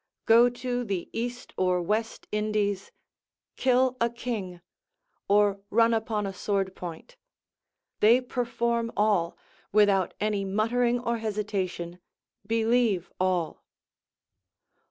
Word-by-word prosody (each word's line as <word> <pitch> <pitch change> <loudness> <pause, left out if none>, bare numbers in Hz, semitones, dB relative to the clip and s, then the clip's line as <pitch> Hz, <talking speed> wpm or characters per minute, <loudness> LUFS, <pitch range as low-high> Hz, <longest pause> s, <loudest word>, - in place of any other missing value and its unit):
go 235 +2 +6
to 245 0 -3
the 195 -6 -3
East 245 +2 -4
or 185 -1 +2
West 215 +6 -2
Indies, 210 -2 -1 0.6
kill 255 0 +2
a 235 - +3
king, 220 -7 -5 0.7
or 205 0 +3
run 230 +2 +4
upon 220 -2 -1
a 195 - -4
sword 195 -1 -1
point: 180 - -8 0.8
they 230 +4 +6
perform 235 -2 -1
all, 205 -5 +2 0.3
without 200 -3 +3
any 210 -1 0
muttering 235 +5 +1
or 235 -1 -2
hesitation, 195 -5 -3 0.5
believe 225 -4 +1
all. 180 -4 0
215 Hz, 105 wpm, -27 LUFS, 195-235 Hz, 0.8 s, go